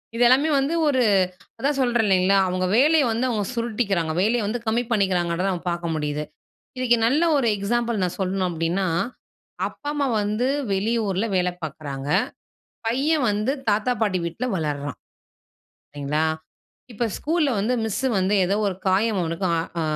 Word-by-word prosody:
இதெல்லாமே 255 +6 +4
வந்து 275 +4 0
ஒரு 260 -3 +3 0.6
அதான் 280 +3 0
சொல்றேன் 240 -3 +2
இல்லைங்களா, 190 0 +4
அவங்க 185 0 -1
வேலைய 295 +2 +5
வந்து 235 +3 0
அவங்க 210 -4 -1
சுருட்டிக்கிறாங்க, 210 -8 -1
வேலைய 230 +4 +2
வந்து 240 +3 -2
கம்மி 235 +2 +1
பண்ணிக்குறாங்கன்றத 185 -3 +1
நம்ம 175 - -6
பாக்க 170 0 -4
முடியுது. 150 0 -2 0.6
இதுக்கு 240 -2 +3
நல்ல 290 +7 +2
ஒரு 270 - +1
எக்ஸாம்பிள் 230 +2 -1
நான் 180 -1 -1
சொல்லணும் 190 -1 0
அப்படின்னா, 170 +3 -1 0.8
அப்பா 290 - -9
அம்மா 285 -2 0
வந்து 210 +4 0 0.3
வெளியூரில 210 0 0
வேல 180 0 +2
பாக்குறாங்க, 140 -3 -6 0.8
பையன் 280 +4 +1
வந்து 210 +5 0 0.2
தாத்தா 210 +4 +1
பாட்டி 195 -4 +1
வீட்ல 170 +9 -3
வளர்றான், 145 -3 -3 1.0
சரிங்களா? 145 +2 -1 0.7
இப்ப 235 - -2
ஸ்கூல்ல 315 -1 +1
வந்து 220 +5 0
மிஸ்ஸு 225 +4 -1
வந்து 190 +2 +1
ஏதோ 195 +3 +1
ஒரு 185 - -2
காயம் 200 +2 +2
அவனுக்கு 170 +2 -2
ஆ - - +1 0.2
ஆ - - 0
205 Hz, 145 wpm, -23 LUFS, 180-240 Hz, 1.0 s, வேலைய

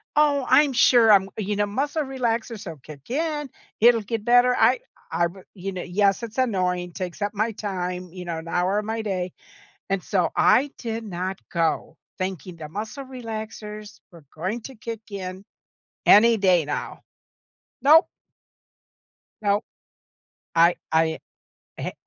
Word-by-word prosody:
"Oh, 290 -2 +3
I'm 290 -1 +5
sure 240 -2 +6
I'm" 195 -2 +5
you 210 -1 -2
know, 205 - +2
"muscle 285 +9 -1
relaxers 235 -5 -2
will 165 -4 -7
kick 140 0 -13
in. 295 +1 -2 0.3
It'll 235 0 +6
get 220 +1 -4
better." 245 +2 +5
I - - +4 0.3
I 170 - +2
b 190 +3 -13
you 195 +1 -5
know, 180 - -4
yes, 195 +4 +1
it's 230 +1 -7
annoying, 180 -7 0
takes 185 +1 -6
up 205 0 -1
my 215 +2 0
time, 180 -3 -4
you 180 -1 -7
know, 170 -2 -4
an 160 +1 -8
hour 180 +4 +1
of 210 - -5
my 225 +1 -2
day, 185 -4 -3 0.6
and 195 -1 0
so 185 -2 +1
I 280 +3 +4
did 225 -1 -4
not 185 -1 -4
go, 165 -2 -1 0.2
thinking 185 -2 -4
the 155 -2 -9
muscle 215 - -5
relaxers 220 -4 -7
were 170 -4 -15
going 190 +9 -3
to 265 - -9
kick 225 0 -6
in 190 -1 -6 0.6
any 230 +2 +7
day 185 -5 +3
now. 145 - -4 0.8
Nope. 315 +5 +7 1.4
Nope. 205 +1 +1 0.9
I 170 +1 +5 0.2
I 160 0 +2 0.6
I - - -7
h - - -3
205 Hz, 155 wpm, -24 LUFS, 180-235 Hz, 1.4 s, any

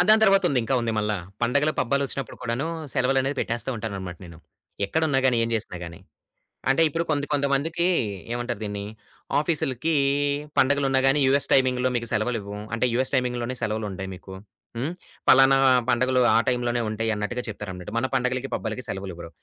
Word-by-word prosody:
ఆ - - +7
దాని 220 0 +6
తరవాత 195 -1 +5
ఉంది. 135 - +1
ఇంకా 130 - 0
ఉంది 115 -1 -1
మల్లా. 105 0 0 0.3
పండగలు, 140 +6 +2
పబ్బాలోచ్చినప్పుడు 140 +1 -1
కూడాను 125 +4 -2 0.3
సెలవులనేది 135 +1 +1
పెట్టేస్తా 120 +2 -1
ఉంటానన్నమాట 95 -5 -5
నేను. 85 -2 -12 0.5
ఎక్కడున్నాగాని, 135 -4 +2
ఏం - - -2
జేసినా 110 -5 -3
గాని. 85 +2 -10 0.7
అంటే 135 +5 +3
ఇప్పుడు 165 +3 -1
కొంతి 145 -1 +1
కొంతమందికి 145 +4 +1 0.5
ఏమంటారు 120 -2 -3
దీన్ని? 100 -1 -4 0.5
ఆఫీసులకీ 155 -1 0 0.6
పండగలున్నా 135 0 +3
గాని 140 +2 +3
యూఎస్ 140 +1 +3
టైమింగ్‌లో 130 -1 +3
మీకు 120 -1 -1
సెలవులివ్వం. 105 -2 -2
అంటే 115 +2 +1
యూఎస్ 130 +3 0
టైమింగ్‌లోనే 125 -1 -1
సెలవులుంటాయి 105 -3 -3
మీకు. 95 +1 -12 0.4
హ్మ్ 135 +7 -2 0.4
పలానా 135 +1 +7 0.3
పండగలు 130 +1 +2
ఆ - - +5
టైంలోనే 120 -1 0
ఉంటాయి 110 +1 -1
అన్నట్టుగా 120 +4 -3
చెప్తారన‌మాట. 95 -4 -7
మన 115 - +1
పండగలకి, 125 0 -1
పబ్బాలకి 110 +3 -4
సెలవులివ్వరు. 95 -4 -6
125 Hz, 150 wpm, -25 LUFS, 110-135 Hz, 0.7 s, ఆ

